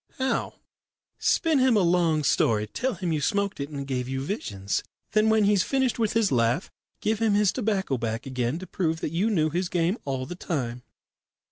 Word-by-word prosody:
"How?" 265 -1 -1 0.6
"Spin 320 -5 +2
him 255 -3 +4
a - - +4
long 170 -3 +2
story. 110 -5 +2
Tell 250 - -2
him 170 -2 -2
you 150 - -1
smoked 200 +3 0
it 140 +1 -3
and 145 -2 -5
it - - -5
gave 125 -2 -3
you 135 0 -2
visions. 100 - -3 0.3
Then 215 +1 +3
when 220 -1 +4
he's 200 -1 +4
finished 265 -1 0
with 220 -2 +1
his 225 -3 +2
laugh, 120 +7 +1 0.3
give 215 0 0
him 220 -3 +3
his 205 -2 +4
tobacco 200 - -1
back 115 0 -3
again 125 +1 -1
to 185 - -7
prove 160 -4 -1
that - - -2
you 185 +7 +1
knew 155 -7 +1
his 175 +2 -1
game 180 +5 0
all 135 -2 -3
the 155 - -6
time." 125 -9 -3
175 Hz, 205 wpm, -26 LUFS, 135-210 Hz, 0.6 s, him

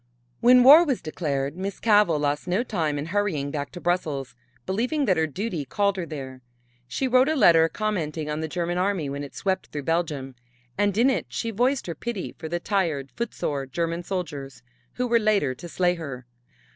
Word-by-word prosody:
When 250 +1 +6
war 295 +6 +10
was 275 -7 0
declared 145 -3 -3
Miss 195 +2 -5
Cavell 210 -7 +4
lost 145 +2 -1
no 185 +6 +1
time 160 - -1
in 145 - -3
hurrying 170 -6 -1
back 145 -2 -4
to 180 - -7
Brussels, 155 -7 -1 0.3
believing 250 +10 0
that 190 -6 +3
her 160 -1 +1
duty 180 0 -3
called 200 +9 0
her 180 -3 -4
there. 130 -4 -7 0.5
She 265 - -1
wrote 255 +3 +4
a 315 - +1
letter 165 - +6
commenting 165 -8 -2
on 150 0 -2
the 160 - -2
German 175 +2 -2
army 185 -6 0
when 140 +1 -4
it 140 - -10
swept 190 -1 -1
through 145 -1 -6
Belgium 150 -4 -1 0.4
and 205 -1 +1
in 250 +4 +5
it - - -2
she 230 - -3
voiced 245 +5 +1
her 170 - -4
pity 230 0 -5
for 160 -1 -6
the 175 +1 -1
tired, 170 -9 -1
footsore 145 - -3
German 170 +4 -2
soldiers, 145 -9 -5 0.3
who 250 - -1
were 235 -1 +3
later 205 - +2
to 170 +7 -10
slay 180 +1 +2
her. 140 -8 -7
175 Hz, 195 wpm, -25 LUFS, 150-210 Hz, 0.5 s, war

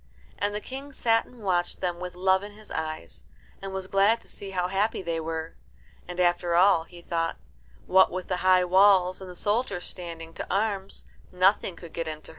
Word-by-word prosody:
And 205 0 -1
the - - -1
King 275 +4 -8
sat 225 -3 +2
and 240 -3 -15
watched 175 -2 0
them 175 -2 -2
with 180 0 -6
love 190 +1 +3
in 205 +1 -9
his 215 +1 -14
eyes, 155 - -5 0.4
and 195 0 -5
was 190 0 -4
glad 200 +4 +3
to - - -17
see 200 - -8
how 180 -2 -1
happy 195 +2 0
they 165 -2 -2
were. 160 0 -4 0.5
And 180 0 -7
after 175 -1 +2
all, 175 -2 +5
he 175 0 -14
thought, 165 -1 -1 0.5
what 190 0 +5
with 185 0 -5
the 180 - -1
high 185 0 +4
walls 185 0 +5
and 190 - -8
the 180 - -9
soldiers 205 -2 -1
standing 165 -2 -7
to - - -6
arms, 195 -1 -1 0.3
nothing 185 0 +2
could 170 -2 -12
get 165 -1 -3
in 155 - -2
to - - -10
hurt - - -26
them. - - -11
185 Hz, 215 wpm, -27 LUFS, 175-200 Hz, 0.5 s, all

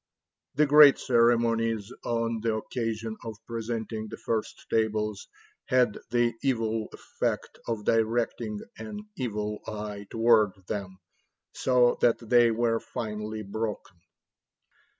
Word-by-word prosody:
The 150 +2 +4
great 145 -1 +8
ceremonies 115 -2 +2
on 115 -1 -1
the 115 -1 0
occasion 110 -1 -3
of 110 -2 -6
presenting 115 -1 -4
the - - -8
first 110 -2 -3
tables 105 -2 -1 0.4
had 125 -4 +2
the 120 0 +2
evil 115 -4 0
effect - - -4
of 110 -3 -3
directing 115 -1 0 0.2
an 210 -1 -6
evil 105 - -3
eye 105 -1 -6
toward 115 -3 +4
them, 95 -3 -4 0.6
so 125 -1 +3
that 120 - +4
they 120 0 +4
were 115 0 +1
finally 110 -1 -5
broken." 105 -2 -5
115 Hz, 110 wpm, -28 LUFS, 105-120 Hz, 0.6 s, great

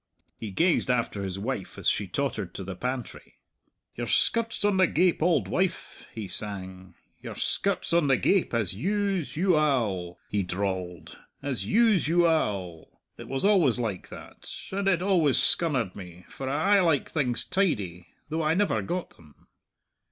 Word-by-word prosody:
He 110 - -5
gazed 165 - +2
after 120 -5 0
his 95 -1 -4
wife 105 -1 -4
as - - -3
she 100 - +2
tottered 105 -5 -3
to 95 - -5
the 95 0 -6
pantry. 125 +4 -5 0.6
"Your 120 0 -4
skirt's 230 - +1
on 205 -2 +3
the 185 -1 +5
gape, 175 +1 +2
auld 170 -1 +2
wife," 185 -1 -2
he 110 -3 -6
sang; 95 -3 -6 0.3
"your - - -7
skirt's 195 -3 -1
on 170 -3 +3
the 135 -2 +4
gape; 195 +7 +2
as 110 -7 0
use 195 - -1
u 180 0 +3
al," 110 - 0
he 105 - 0
drawled; 90 -3 -4 0.2
"as 140 -4 -2
use 220 -7 +3
u 170 +2 +4
al. 100 - -1 0.2
It - - -8
was 135 +6 -2
always 180 - +4
like 110 -6 -3
that; - - -11 0.2
and 195 +1 -1
it 180 -2 +2
always 170 -9 +3
scunnered 130 - +1
me, 90 -2 -11
for 135 -1 -5
I 160 +9 +3
aye - - +4
liked 160 -6 +2
things 130 -6 0
tidy 105 - -1 0.2
though 160 +1 -1
I 155 +1 +2
never 205 +2 +1
got 175 +1 -4
them. 75 -3 -21
135 Hz, 165 wpm, -27 LUFS, -, 0.6 s, the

